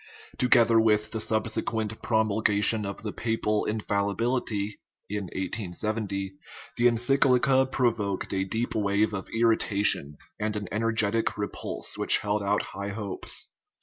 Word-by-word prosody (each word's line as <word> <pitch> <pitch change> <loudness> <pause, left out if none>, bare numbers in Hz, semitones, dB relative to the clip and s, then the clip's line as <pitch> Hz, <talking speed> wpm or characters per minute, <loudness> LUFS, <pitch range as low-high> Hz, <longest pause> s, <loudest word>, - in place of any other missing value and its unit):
Together 120 -3 +5
with 105 -1 +2
the 110 - -3
subsequent 110 0 -1
promulgation 110 -1 +2
of 100 - -7
the 105 - -4
papal 110 -2 -1
infallibility 105 0 -1 0.3
(1870), 100 0 -3 0.4
the 120 - +4
en 120 -1 +2
cyclica 130 +1 +3
provoked 110 -8 0
a 95 0 0
deep 115 +5 -2
wave 105 0 +1
of 95 -1 -5
irritation 105 -9 +3 0.3
and 105 0 -2
an 105 -2 -4
en 105 - -2
ergetic 115 -1 +1
repulse 100 -1 -4
which - - +4
held 105 0 -1
out 100 +1 +1
high 100 +1 -5
hopes. 100 -2 -4
105 Hz, 125 wpm, -27 LUFS, 100-115 Hz, 0.4 s, Together